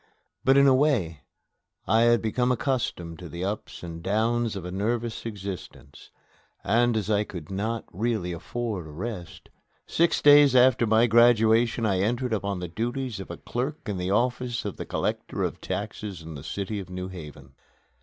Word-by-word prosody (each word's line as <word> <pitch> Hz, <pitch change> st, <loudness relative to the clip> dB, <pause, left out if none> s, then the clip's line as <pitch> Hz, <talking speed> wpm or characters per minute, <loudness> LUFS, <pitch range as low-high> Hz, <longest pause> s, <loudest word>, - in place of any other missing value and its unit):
But, 135 Hz, +1 st, +5 dB
in 140 Hz, -, +6 dB
a 135 Hz, -, +6 dB
way, 125 Hz, -, +1 dB, 0.6 s
I 110 Hz, +1 st, +3 dB
had 120 Hz, -1 st, +4 dB
become 125 Hz, +3 st, +1 dB
accustomed 120 Hz, -, -2 dB
to 90 Hz, -, -8 dB
the 85 Hz, +4 st, -5 dB
ups 105 Hz, -1 st, -5 dB
and 85 Hz, -1 st, -7 dB
downs 110 Hz, +4 st, 0 dB
of 95 Hz, -3 st, -6 dB
a 90 Hz, -, -5 dB
nervous 115 Hz, +4 st, -2 dB
existence, 100 Hz, -4 st, -8 dB, 0.5 s
and, 120 Hz, +3 st, +2 dB
as 105 Hz, -, -2 dB
I 105 Hz, 0 st, +3 dB
could 85 Hz, -5 st, -9 dB
not 110 Hz, +4 st, -2 dB
really 110 Hz, -4 st, -1 dB
afford 100 Hz, 0 st, -4 dB
a -, -, -10 dB
rest, 90 Hz, +2 st, -7 dB, 0.4 s
six 170 Hz, +1 st, +2 dB
days 145 Hz, -2 st, +7 dB
after 125 Hz, -2 st, +5 dB
my 110 Hz, +2 st, +5 dB
graduation 115 Hz, 0 st, +4 dB
I 95 Hz, -3 st, +1 dB
entered 120 Hz, +4 st, 0 dB
upon 100 Hz, -2 st, -1 dB
the 90 Hz, -, -4 dB
duties 120 Hz, +4 st, -3 dB
of 95 Hz, -, -8 dB
a -, -, -6 dB
clerk 130 Hz, +3 st, -4 dB
in 100 Hz, -2 st, -2 dB
the 90 Hz, 0 st, -2 dB
office 120 Hz, +3 st, 0 dB
of -, -, -4 dB
the -, -, -6 dB
Collector -, -, -2 dB
of -, -, -3 dB
Taxes 100 Hz, -6 st, -5 dB
in 80 Hz, 0 st, -8 dB
the 70 Hz, -2 st, -9 dB
city 100 Hz, +5 st, -4 dB
of 95 Hz, -2 st, -8 dB
New 90 Hz, 0 st, -5 dB
Haven. 75 Hz, -6 st, -10 dB
110 Hz, 175 wpm, -26 LUFS, 90-120 Hz, 0.6 s, days